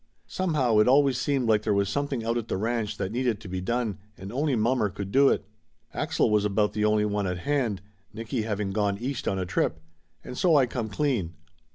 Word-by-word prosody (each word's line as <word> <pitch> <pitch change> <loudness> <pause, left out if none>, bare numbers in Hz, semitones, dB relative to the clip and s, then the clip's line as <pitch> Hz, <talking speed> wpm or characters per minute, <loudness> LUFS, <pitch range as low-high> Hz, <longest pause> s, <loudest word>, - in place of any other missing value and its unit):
Some 185 -4 -2
how 120 -7 +3
it 105 - +4
always 135 0 +4
seemed 135 -4 0
like 110 -2 +3
there 105 -1 0
was 100 0 +2
something 135 +1 -2
out 115 +1 0
at 120 -2 -2
the - - -2
ranch 115 +1 -2
that 95 -1 -3
needed 120 -3 0
to 105 - -11
be 95 0 -4
done 115 +1 -2 0.2
and 95 +4 -8
only 140 +1 +1
mommer 115 -1 +1
could 100 +1 -6
do 135 +3 +5
it. - - 0 0.5
Axel - - 0
was 105 -1 +3
about 105 0 +1
the 105 - -1
only 105 0 +3
one 105 -1 -1
at 90 -1 -2
hand, 115 -4 -1 0.3
Nicky 115 +3 -3
having 105 -2 -2
gone 100 -1 0
East 125 +3 -4
on 95 - 0
a 95 - -2
trip. 85 -2 -1 0.4
And 125 - -8
so 170 +1 +3
I 140 -3 +5
come 120 -2 -4
clean. 100 - -1
110 Hz, 225 wpm, -26 LUFS, 100-130 Hz, 0.5 s, do